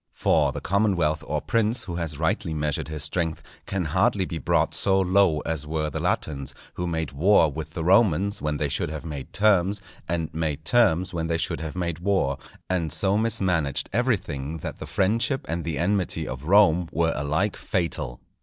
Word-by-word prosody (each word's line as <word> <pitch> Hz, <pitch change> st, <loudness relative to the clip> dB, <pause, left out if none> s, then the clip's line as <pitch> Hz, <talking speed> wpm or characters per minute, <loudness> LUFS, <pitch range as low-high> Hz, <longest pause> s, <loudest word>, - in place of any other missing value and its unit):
For -, -, +2 dB
the -, -, -6 dB
commonwealth 90 Hz, -7 st, +1 dB
or -, -, -1 dB
prince 115 Hz, +1 st, +1 dB
who 85 Hz, -2 st, -5 dB
has 80 Hz, -4 st, -3 dB
rightly 80 Hz, 0 st, -1 dB
measured 75 Hz, -2 st, -2 dB
his 75 Hz, -2 st, -3 dB
strength, 80 Hz, 0 st, -2 dB, 0.2 s
can 95 Hz, -3 st, -2 dB
hardly 95 Hz, +5 st, +2 dB
be 85 Hz, -3 st, -5 dB
brought -, -, +1 dB
so 95 Hz, -1 st, +2 dB
low 95 Hz, -4 st, +3 dB
as 75 Hz, -2 st, -3 dB
were 75 Hz, -1 st, -2 dB
the -, -, -3 dB
Latins, 70 Hz, -3 st, -2 dB, 0.2 s
who 90 Hz, -, -3 dB
made 80 Hz, -4 st, -2 dB
war 80 Hz, +2 st, +4 dB
with 80 Hz, +2 st, -7 dB
the 80 Hz, -, -2 dB
Romans 95 Hz, 0 st, +3 dB
when 75 Hz, 0 st, -1 dB
they 75 Hz, -, 0 dB
should 70 Hz, -, -2 dB
have 80 Hz, +1 st, -6 dB
made 75 Hz, -4 st, -6 dB
terms, 100 Hz, -1 st, +3 dB, 0.3 s
and 85 Hz, -2 st, -2 dB
made 80 Hz, -1 st, -2 dB
terms 95 Hz, -8 st, +3 dB
when 80 Hz, -1 st, -2 dB
they 85 Hz, 0 st, 0 dB
should 85 Hz, -, -2 dB
have 80 Hz, -1 st, -5 dB
made 85 Hz, -3 st, -2 dB
war, 90 Hz, -8 st, 0 dB, 0.3 s
and 85 Hz, -4 st, -1 dB
so 95 Hz, +6 st, +3 dB
mismanaged 95 Hz, -, 0 dB
everything 85 Hz, -, -1 dB
that 75 Hz, -, -6 dB
the -, -, -7 dB
friendship 115 Hz, +7 st, 0 dB
and 85 Hz, +1 st, -2 dB
the 80 Hz, -3 st, -3 dB
enmity 95 Hz, +2 st, 0 dB
of 65 Hz, +2 st, -6 dB
Rome 90 Hz, -2 st, +4 dB
were 80 Hz, 0 st, +1 dB
alike 75 Hz, +9 st, 0 dB
fatal. 75 Hz, -9 st, -2 dB
85 Hz, 185 wpm, -25 LUFS, 75-95 Hz, 0.3 s, war